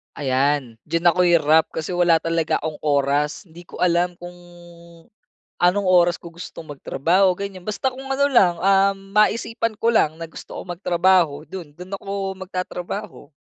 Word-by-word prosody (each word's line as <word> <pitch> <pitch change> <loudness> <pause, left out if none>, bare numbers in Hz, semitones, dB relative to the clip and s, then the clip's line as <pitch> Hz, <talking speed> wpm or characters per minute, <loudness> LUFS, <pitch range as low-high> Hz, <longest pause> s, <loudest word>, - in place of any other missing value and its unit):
Ayan, 135 -3 0
diyan 170 +2 +3
ako 180 - +1
hirap. 160 -2 +4
Kasi 160 +2 -4
wala 175 -2 +3
talaga 165 -1 0
akong 155 -1 -5
oras, 145 +1 0
hindi 175 0 -15
ko - - -10
alam 175 0 +1
kung 175 0 -11 1.2
anong 185 +3 +2
oras 175 -1 +4
ko 170 - -11
gustong 165 -2 -10
magtrabaho 180 +7 +1
ganyan. 195 -2 -6
Basta 215 +5 -1
kung 265 +1 -10
ano 275 +1 +2
lang, 200 -11 +4
ah, 195 +1 +3
maisipan 215 +3 0
ko 230 - +2
lang 155 -6 +2
na 165 - -6
gusto 165 - -10
kong 175 -1 -6
magtrabaho 175 -5 +2
'dun, 180 -6 -8
'dun 180 +2 -8
ako 195 -1 -4
magtatrabaho. 185 -2 -6
175 Hz, 155 wpm, -22 LUFS, 160-195 Hz, 1.2 s, hirap